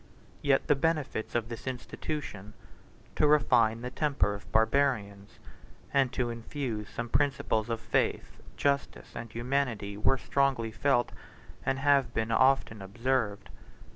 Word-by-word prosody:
Yet 140 -2 +2
the - - +4
benefits 150 -7 -1
of 115 -2 0
this 115 +2 -8
institution, 125 -4 -5 0.6
to 150 - +3
refine 115 -6 +4
the 125 +1 -5
temper 135 - +1
of 100 - -10
Barbarians, 110 -4 +1 0.6
and 135 -3 +3
to 120 -2 -1
infuse 115 -2 -4
some 120 - -4
principles 120 -4 0
of 115 -1 -1
faith, - - -1 0.2
justice, 140 -1 -1
and 115 -1 -7
humanity, 120 -5 -2
were 110 +6 +2
strongly 130 -4 0
felt, 120 +2 +1 0.5
and 135 0 0
have 135 -3 +2
been 110 0 0
often 130 -4 +3
observed. 115 +1 -1
120 Hz, 130 wpm, -29 LUFS, 110-140 Hz, 0.6 s, the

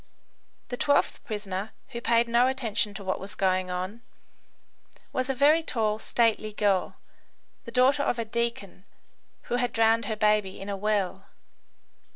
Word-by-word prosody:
The 245 - -4
twelfth 285 +2 +1
prisoner, 205 -1 -4 0.2
who 235 -3 -6
paid 235 0 +3
no 235 +2 +4
attention 225 -5 -1
to 200 - -7
what 190 0 -2
was 195 +1 -8
going 185 -1 +1
on, 185 +5 -4 1.1
was 255 +1 -1
a 270 - 0
very 295 +5 +5
tall, 220 -8 -1
stately 220 -2 +1
girl, 200 -3 +1 0.7
the 235 - -8
daughter 260 +4 +4
of 245 - 0
a 230 - -2
deacon, 230 -4 -3 0.6
who 245 - -1
had 245 -1 0
drowned 225 0 +3
her 220 - -2
baby 210 -2 +1
in 195 - -7
a 200 - -2
well. 195 -2 -1
220 Hz, 155 wpm, -27 LUFS, 200-240 Hz, 1.1 s, very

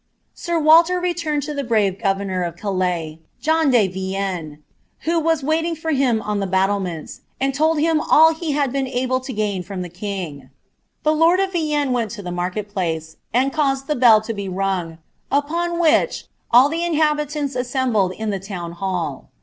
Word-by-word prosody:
Sir 345 -1 -2
Waller 330 +3 +5
TCUirapd 335 -5 -2
lu 300 - -3
the 285 -1 -3
brave 210 -5 +1
governor 195 -2 -1
of 170 -1 -3
Calais, 180 -5 -2 0.2
John 320 -1 +2
de 235 -6 +4
Vienue, 190 -4 -4 0.4
who 335 +1 +1
wa$ 325 +1 +2
•rniUiig 320 +3 -1
for 320 +1 -3
him 255 -6 +1
on 210 -1 -2
lh« 195 -1 -2
luttlemeuU, 190 -3 -1 0.3
&nd 275 - 0
told 310 +3 +2
him 320 0 +2
all 320 +1 +5
he 320 -2 -3
had 280 -3 0
been 270 0 -1
able 255 0 0
l» - - -6
litn 210 -6 -2
fruui 185 +1 -6
the 175 - -7
king, 175 -7 -6 0.5
The 310 - +3
lord 330 +4 +4
of 390 -1 0
Vienne 300 -5 0
went 235 -2 -1
lo 205 - -8
the 180 - -5
market 180 +4 -3
plare, 165 -5 -1 0.3
and 265 +3 +1
Mused 270 -3 0
the 300 - -1
bell 230 -4 +6
lo 230 - -2
be 200 -2 -5
rung, 185 -3 -2 0.3
upon 335 +5 0
which 325 -3 +2 0.2
all 250 +3 +7
the 325 +3 -3
inhabiianis 300 -4 0
assembled 245 -6 0
in 220 +2 -3
tfac 195 -1 -5
tona 175 -4 -6
4iall. 175 -7 -3
245 Hz, 180 wpm, -21 LUFS, 190-305 Hz, 0.5 s, all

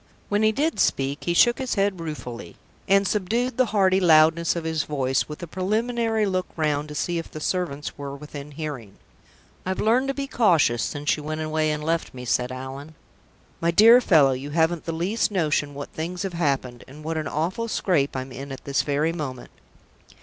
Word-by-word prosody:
When 205 +1 +1
he 215 0 +4
did 300 +8 -1
speak, 140 +2 0
he 175 - 0
shook 240 +6 +5
his 260 -1 -2
head 195 -2 +1
ruefully, 150 -7 -7 0.3
and 195 0 +4
subdued 225 +6 0
the 255 -1 +3
hearty 190 -3 +3
loudness 165 -1 +4
of 170 - -3
his 160 -1 -1
voice, 135 -2 -1
with 150 +3 -7
a - - -2
preliminary 220 +5 0
look 185 -2 -1
round 150 -2 0
to 150 - -8
see 170 +2 -1
if 165 - -7
the 155 - -8
servants 155 -4 -3
were 140 -1 -5
within 145 0 -9
hearing. 140 -9 -6 0.7
"I've 185 0 -3
learned 245 +5 +2
to 275 - -1
be 280 - -2
cautious 170 - +3
since 145 0 -1
you - - -7
went 155 +1 -4
away 155 0 0
and 150 0 -3
left 165 -3 -1
me," 125 0 -7
said 125 +3 0
Allan. 135 +4 -8 0.7
"My 165 - +2
dear 225 +8 +7
fellow, 155 - +5
you 130 +2 -4
haven't 160 +2 +1
the 165 - -2
least 180 +9 0
notion 150 -7 0
what 140 0 -6
things 175 +3 -4
have 195 -2 -4
happened, 135 -7 -1
and 150 +3 -12
what 160 +1 -3
an 155 -1 -2
awful 175 +11 -2
scrape 170 -11 0
I'm 130 0 -4
in 135 +2 -8
at 135 - -8
this 140 -1 +1
very 150 +3 0
moment!" 135 -7 -6
160 Hz, 200 wpm, -24 LUFS, 145-190 Hz, 0.7 s, dear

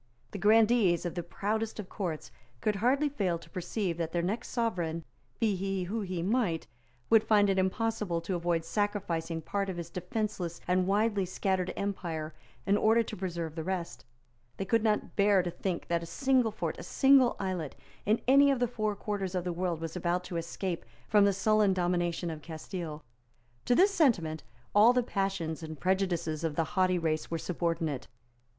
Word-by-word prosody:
The 200 - -6
grandees 215 -3 +4
of 175 - -2
the 175 - -2
proudest 215 +6 -3
of 205 - -5
Courts 175 -7 -4 0.3
could 210 - 0
hardly 265 +8 +2
fail 195 -12 -1
to - - -15
perceive 180 -1 -2
that 165 -1 -2
their 170 -1 0
next 205 +6 -2
sovereign, 175 -8 -1 0.4
be 215 -3 +2
he 195 0 -2
who 215 +5 -3
he 185 -4 -3
might, 195 -5 0 0.5
would 225 -1 +7
find 205 -2 +4
it 190 - +1
impossible 190 -2 0
to 185 - -3
avoid 170 -2 0
sacrificing 170 -6 -2
part 200 -1 -2
of 185 - -4
his 170 -1 -6
defenceless 180 -2 -3
and 180 +1 +2
widely 205 0 +2
scattered 185 0 -1
empire 170 -6 -3 0.3
in 200 - +3
order 225 +2 +4
to - - -7
preserve 170 -4 -4
the 160 -1 -4
rest; 170 -8 -4 0.5
they 195 - -3
could 230 +2 +2
not 215 -2 0
bear 200 -2 +4
to 175 - -3
think 180 0 -3
that 170 -1 0
a 170 - -7
single 255 +5 +2
fort, 215 - -4
a - - -7
single 270 -3 +5
islet, 185 -6 -3 0.3
in 215 +2 +2
any 280 +2 +7
of 275 - +3
the 245 - +2
four 215 -3 -2
quarters 195 -2 -3
of 180 - 0
the 175 -1 -2
world 175 -1 -1
was 165 0 -5
about 180 0 0
to 180 - -7
escape 170 +1 -3 0.2
from 205 -1 +5
the 200 - +4
sullen 205 +1 +3
domination 175 -1 0
of 155 -1 -7
Castile. 160 -1 -6 0.6
To 245 - +3
this 390 +7 +5
sentiment 180 - +2 0.3
all 215 +4 +7
the 250 0 +2
passions 195 -7 -2
and 160 -2 -7
prejudices 175 -3 0
of 160 -2 -1
the 165 - +2
haughty 185 -2 +3
race 160 -2 -1
were 165 - -1
subordinate. 165 -4 -2
185 Hz, 185 wpm, -30 LUFS, 170-210 Hz, 0.6 s, would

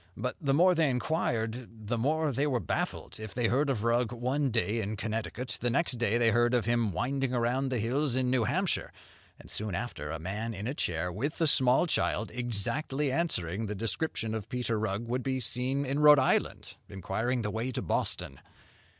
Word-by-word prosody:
But 125 +4 -2
the 140 -3 +1
more 180 +4 +6
they 160 -4 +3
inquired, 125 -4 -1 0.2
the 120 - 0
more 155 +4 +1
they 140 +4 0
were 130 -4 +1
baffled. - - -3
If 110 -2 -8
they 120 -1 +1
heard 140 +4 +2
of 115 -6 -1
Rugg 120 0 +2
one 130 +4 0
day 115 -1 0
in 105 +1 -3
Connecticut, 115 +4 -4
the 120 - +1
next 125 -2 +1
day 120 -1 +2
they 115 -1 +4
heard 120 +2 +3
of 120 - +1
him 120 -2 +1
winding 130 +6 -1
around 125 +3 +1
the 130 - -1
hills 125 +4 0
in 130 -1 +1
New 125 -3 +2
Hampshire; 180 - 0 0.5
and - - -11
soon 105 -4 -2
after, 80 -10 -4
a 80 - -3
man 105 +7 -4
in 100 +2 -5
a 130 - -1
chair, 90 - -1
with 135 - -3
a 165 - +3
small 130 0 +4
child, 115 -9 0
exactly 125 +5 -1
answering 110 - -1
the 105 - -3
description 115 +2 -2
of 110 -1 -5
Peter 125 -4 -1
Rugg, 110 +2 -2
would 125 +2 -1
be 130 0 -1
seen 130 +3 0
in 140 +2 -1
Rhode 150 0 +8
Island, 130 - 0
inquiring 110 +6 -2
the 105 - -2
way 115 +4 -2
to 130 0 -3
Boston. 65 - -2
120 Hz, 200 wpm, -30 LUFS, 110-135 Hz, 0.5 s, Rhode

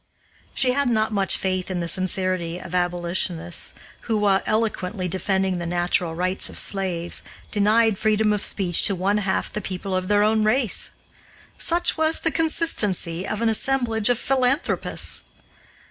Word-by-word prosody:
She 255 - +2
had 280 0 +1
not 220 -1 0
much 195 -2 +2
faith 185 -1 -2
in 185 -1 -2
the 170 - -3
sincerity 185 -2 -1
of 180 -1 -10
abolitionists 175 -1 0 0.3
who, 225 -2 +1
while 200 -2 +2
eloquently 215 -4 -1
defending 190 0 -1
the 170 - -4
natural 175 -1 0
rights 185 +2 0
of - - -9
slaves, 180 -3 0 0.3
denied 215 0 +3
freedom 215 0 +2
of 205 - -2
speech 180 -4 +2
to 200 - +1
one 195 +3 0
half 195 -2 -1
the 210 - -3
people 190 0 -4
of 185 0 -2
their 205 +1 +3
own 215 0 +2
race. 220 0 +2 0.7
Such 340 -1 +1
was 320 0 +2
the 330 - 0
consistency 210 - 0
of 215 +2 -3
an 230 - +3
assemblage 225 -1 +1
of 245 - +3
philanthropists! 265 +3 +1
195 Hz, 155 wpm, -23 LUFS, 180-220 Hz, 0.7 s, denied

